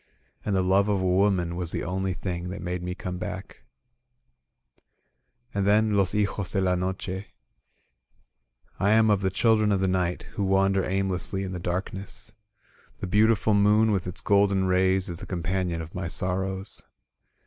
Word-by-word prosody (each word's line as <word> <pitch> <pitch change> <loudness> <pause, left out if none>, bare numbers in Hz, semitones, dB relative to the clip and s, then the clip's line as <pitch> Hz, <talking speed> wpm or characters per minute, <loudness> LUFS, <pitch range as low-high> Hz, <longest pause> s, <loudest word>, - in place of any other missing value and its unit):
And 100 - -1
the 95 - +2
love 95 +2 +3
of 100 -2 +2
a 95 - -1
woman 90 -2 +2
was 90 -2 -1
the - - -3
only 95 +1 -2
thing 90 0 -4
That 90 -1 -6
made 90 0 -3
me 90 0 -4
come 90 -1 -5
ba^Jc. - - -6 2.0
And 100 -1 0
then 110 +1 +4
*^Los 100 -2 +2
Hijos 100 -2 -1
de 100 - +1
la 95 -1 +2
Noche: 95 +1 -3 0.8
"/ - - -40
am 110 +2 +4
of 100 -2 +2
the 95 - +1
children 110 +2 +3
of 100 - +2
the 95 - +1
night 90 -1 0
Who 100 - -2
wander 95 0 +2
aimlessly 95 0 -1
in 95 - -4
the 90 - -4
darkness. 95 +4 -4 0.7
The - - -3
beautiful 110 +3 +3
moon 105 +2 +4
with 95 -3 -1
its 90 - -6
golden 100 -1 +3
rays 95 0 +2
Is 85 -1 -5
the - - -8
companion 90 -1 -2
of 80 - -12
my 90 -1 -3
sorrows. 95 +2 -3
95 Hz, 170 wpm, -26 LUFS, 90-100 Hz, 2.0 s, then